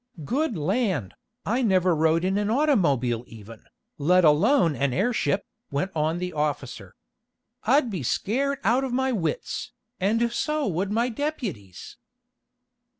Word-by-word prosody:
"Good 265 - -1
land, 180 - -1 0.3
I 235 +5 0
never 185 -6 +3
rode 160 +2 +2
in 190 +2 +1
an 210 0 -1
automobile 165 - +2
even, 110 0 -13 0.3
let 180 +4 +4
alone 165 - +4
an 135 +1 0
airship!" 200 - 0 0.2
went 145 +7 -2
on 160 +2 0
the 180 0 -4
officer. 140 - -3 0.7
"I'd 255 0 +3
be 185 -6 -3
scared 270 - 0
out 250 +4 +2
of 265 - -3
my 265 +1 +1
wits, 165 - -3 0.3
and 230 +5 +1
so 300 +3 -1
would 190 +1 -1
my 235 +3 +1
deputies." 220 - -5
190 Hz, 135 wpm, -25 LUFS, 150-240 Hz, 0.7 s, let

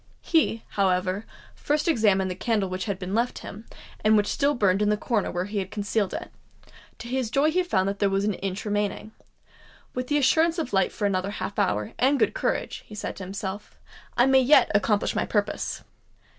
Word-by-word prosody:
He, 295 -9 +1
however, 190 +1 0 0.3
first 295 +2 -1
examined 205 - +3
the - - -4
candle 210 -1 0
which 185 0 -3
had 200 -4 -2
been 185 +1 -5
left 235 +3 0
him, 215 +3 -9 0.4
and 215 0 +5
which 205 - +3
still 285 +6 +1
burned 200 -3 +2
in 210 - +2
the 210 - +2
corner 215 -1 -1
where 180 +1 -2
he 205 +1 -3
had 190 -1 -4
concealed 205 -1 -1
it:—to - - -12
his 255 -2 -1
joy 280 +6 +2
he 365 +3 +2
found 195 - 0
that 200 0 -3
there 200 - +3
was 195 +1 0
an 210 - +1
inch 195 +2 -4
remaining. 205 +1 -2 0.8
"With 250 0 -3
the 295 - +2
assurance 320 +5 +3
of 315 -9 -3
light 190 -1 +2
for 205 - -3
another 190 -1 0
half 205 0 -4
hour, 105 +1 0
and 270 +3 +3
good - - +2
courage," - - -2
he 215 - -10
said 210 - -5
to 195 - -6
himself, 195 +2 -6 0.4
"I 240 - +6
may 265 0 +5
yet 265 0 +5
accomplish 205 0 +1
my - - 0
purpose." 205 -1 -2
210 Hz, 200 wpm, -25 LUFS, 195-250 Hz, 0.8 s, I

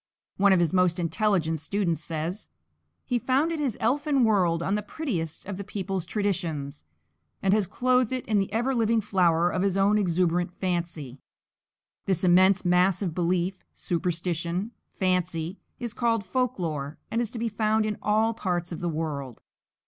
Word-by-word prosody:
One 200 0 +5
of 190 - +5
his 170 -1 +1
most 180 -2 +3
intelligent 165 -1 +1
students 170 0 -1
says: 165 +5 -4 0.6
"He 245 -2 0
founded 295 +7 +1
his 270 -7 -1
elfin 280 +3 +2
world 180 -7 +2
on 195 - 0
the 210 - +1
prettiest 200 - -4
of 200 -2 -5
the 200 - -5
people's 195 -3 -3
traditions, 170 - -2 0.5
and 195 0 +2
has 210 -3 +2
clothed 250 +1 +2
it 255 -1 -3
in 215 -2 +2
the 195 - -1
ever 240 +5 0
living 230 -1 +2
flower 175 -4 +2
of 185 - -1
his 195 -1 +1
own 205 +2 +4
exuberant 175 -1 +1
fancy." 170 -8 -3 0.9
This 190 -2 +1
immense 185 +2 +5
mass 180 +2 +3
of 175 -4 -2
belief, 180 +2 -1
superstition, 175 +3 -2 0.2
fancy, 180 -1 -1 0.2
is 240 -3 -4
called 230 -4 0
folk 250 +5 0
lore 155 -4 -3
and 230 - +1
is 235 - -2
to 235 - -8
be 230 +1 -1
found 215 0 +1
in 210 -1 -3
all 220 +2 +2
parts 180 -5 -2
of 165 - -5
the 175 - -2
world. 145 -6 -4
190 Hz, 165 wpm, -26 LUFS, 170-215 Hz, 0.9 s, One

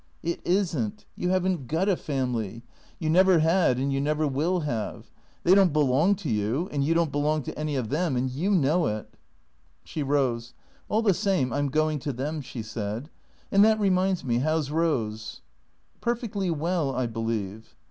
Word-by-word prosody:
"It 170 +1 -2
isn't. 150 - -1
You 180 - -2
haven't 185 -7 0
got 165 +8 0
a 195 - +3
family; 120 - -3 0.3
you 160 - -3
never 185 +3 +5
had 160 -4 +3
and 135 +2 0
you 135 - 0
never 150 +1 +1
will 160 +7 0
have. 120 -8 -4 0.3
They 180 - +5
don't 195 -3 +5
belong 150 +6 +3
to 180 -6 -5
you, 110 - 0
and 140 -1 0
you 160 +4 +2
don't 165 -3 +2
belong 150 +1 0
to - - -6
any 150 -1 -2
of 125 -5 -2
them, 155 0 0
and 125 +1 0
you 145 +10 -2
know 170 - +3
it 105 -1 -4 0.4
" - - -39
She 155 - -5
rose. 130 -4 0 0.2
" - - -33
All 220 +2 +1
the 200 -3 +4
same, 185 - 0
I 145 - 0
'm 145 -1 0
going 155 +1 +1
to 140 +1 -3
them," 145 +5 -3
she 125 -3 -7
said. 110 +5 -5 0.2
" - - -34
And 200 +1 +6
that 220 0 +4
reminds 190 -2 +2
me, 120 -1 +1
how 155 +4 +1
's 145 -2 -4
Rose? 115 -10 -1 0.2
" - - -42
" - - -39
Perfectly 230 -5 -1
well, 165 -2 0
I 130 0 0
believe." 110 -2 -4
150 Hz, 200 wpm, -26 LUFS, 125-180 Hz, 0.4 s, And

